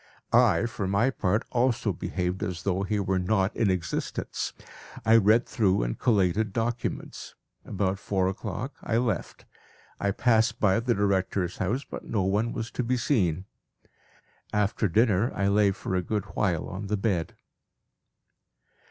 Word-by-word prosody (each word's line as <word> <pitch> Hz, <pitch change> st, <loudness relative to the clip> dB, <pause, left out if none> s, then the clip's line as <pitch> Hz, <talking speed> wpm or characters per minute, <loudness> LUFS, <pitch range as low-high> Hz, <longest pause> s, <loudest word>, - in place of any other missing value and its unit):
I -, -, +5 dB
for 115 Hz, -4 st, -3 dB
my 100 Hz, +7 st, +2 dB
part 105 Hz, -2 st, 0 dB
also 120 Hz, -4 st, +1 dB
behaved 90 Hz, +2 st, -3 dB
as 90 Hz, -2 st, -3 dB
though 95 Hz, -1 st, 0 dB
he 100 Hz, +2 st, -1 dB
were 95 Hz, -1 st, 0 dB
not 95 Hz, +2 st, +1 dB
in 110 Hz, -, +2 dB
existence. 90 Hz, -4 st, -2 dB, 0.5 s
I 110 Hz, -, +6 dB
read 115 Hz, +2 st, +5 dB
through 95 Hz, -, +1 dB
and -, -, -3 dB
collated 105 Hz, -2 st, +2 dB
documents. 120 Hz, +2 st, -3 dB, 0.3 s
About 95 Hz, -1 st, -1 dB
four 95 Hz, -3 st, 0 dB
o'clock 105 Hz, +7 st, -4 dB
I 115 Hz, -, 0 dB
left. 115 Hz, -5 st, -2 dB, 0.5 s
I 100 Hz, -, 0 dB
passed 110 Hz, +2 st, +2 dB
by 95 Hz, -1 st, +3 dB
the 120 Hz, 0 st, 0 dB
director's 95 Hz, -2 st, 0 dB
house, 115 Hz, +9 st, -1 dB
but -, -, -8 dB
no 105 Hz, -4 st, -1 dB
one 105 Hz, +5 st, +1 dB
was 115 Hz, -1 st, -4 dB
to 125 Hz, -, -2 dB
be 125 Hz, +2 st, 0 dB
seen. 95 Hz, -, +1 dB, 1.1 s
After 105 Hz, +1 st, +1 dB
dinner 110 Hz, +3 st, +2 dB
I 100 Hz, 0 st, +1 dB
lay 100 Hz, 0 st, +4 dB
for 95 Hz, -, -4 dB
a 90 Hz, -, +2 dB
good 105 Hz, +2 st, -2 dB
while 90 Hz, -6 st, 0 dB
on 100 Hz, +3 st, -6 dB
the 105 Hz, +1 st, 0 dB
bed. 95 Hz, -5 st, -1 dB
100 Hz, 150 wpm, -27 LUFS, 95-115 Hz, 1.1 s, I